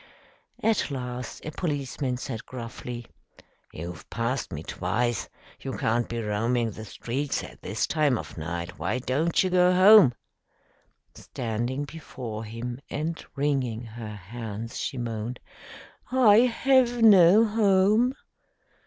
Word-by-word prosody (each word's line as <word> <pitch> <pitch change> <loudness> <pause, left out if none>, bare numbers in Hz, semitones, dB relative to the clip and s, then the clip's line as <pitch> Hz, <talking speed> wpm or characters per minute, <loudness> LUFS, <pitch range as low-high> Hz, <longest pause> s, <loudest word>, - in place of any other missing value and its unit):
At 225 -6 +2
last 125 -3 -6
a 155 - -4
policeman 140 -5 -2
said 120 -3 -6
gruffly, 120 -1 -7 0.7
"You've 85 +1 -8
passed 115 +3 -2
me - - -5
twice. 120 -2 -1 0.3
You - - -5
can't 115 +2 0
be 115 -1 -3
roaming 115 +3 0
the 110 +2 -9
streets 130 +7 -3
at - - -11
this - - -1
time 150 -5 +2
of - - -8
night. 85 +2 -5
Why - - -1
don't 140 +8 +1
you 185 - -1
go 180 0 +5
home?" 190 - +8 1.0
Standing 120 +3 -3
before 125 -8 -7
him 120 +3 -6
and 160 +3 -3
wringing 135 -5 -1
her 110 -2 -8
hands, 115 +3 -7
she 135 - -3
moaned, 115 0 -4 0.7
"I 240 -5 +6
have 245 0 +3
no 200 0 +8
home." 215 +3 +3
125 Hz, 125 wpm, -26 LUFS, 115-170 Hz, 1.0 s, home